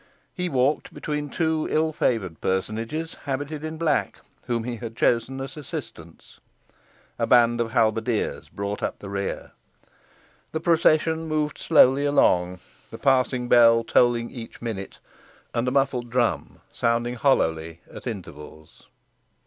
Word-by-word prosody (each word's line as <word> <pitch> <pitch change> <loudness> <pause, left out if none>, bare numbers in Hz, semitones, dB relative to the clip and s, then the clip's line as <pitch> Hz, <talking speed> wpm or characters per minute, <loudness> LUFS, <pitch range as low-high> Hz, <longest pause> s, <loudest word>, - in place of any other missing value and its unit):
He 180 -1 -2
walked 135 +1 0
between 150 -1 -3
two 160 0 0
ill 155 0 +1
favoured 100 - -1
personages 115 - -2
habited 145 +2 -3
in 155 0 -5
black, 150 - 0 0.3
whom 115 -2 -1
he 120 0 -4
had 115 -1 -7
chosen 120 +3 +1
as 135 0 -6
assistants. 85 - -9 0.8
A 115 - +1
band 120 -1 +4
of 115 - -1
halberdiers 110 0 0
brought 100 +1 -4
up - - -2
the 100 - -9
rear. 100 0 -4 1.0
The 160 - -1
procession 160 -1 +2
moved 155 -1 -1
slowly 140 -3 +5
along, 90 -10 +2 0.3
the - - -8
passing 130 -2 +1
bell 115 -1 +6
tolling 120 0 +2
each 120 -3 -9
minute, 110 -5 -5 0.6
and 120 +2 -1
a - - +1
muffled 135 -3 0
drum 120 -1 -1
sounding 120 +1 0
hollowly 85 - 0
at - - -9
intervals. 80 -7 -9
120 Hz, 135 wpm, -24 LUFS, 110-145 Hz, 1.0 s, bell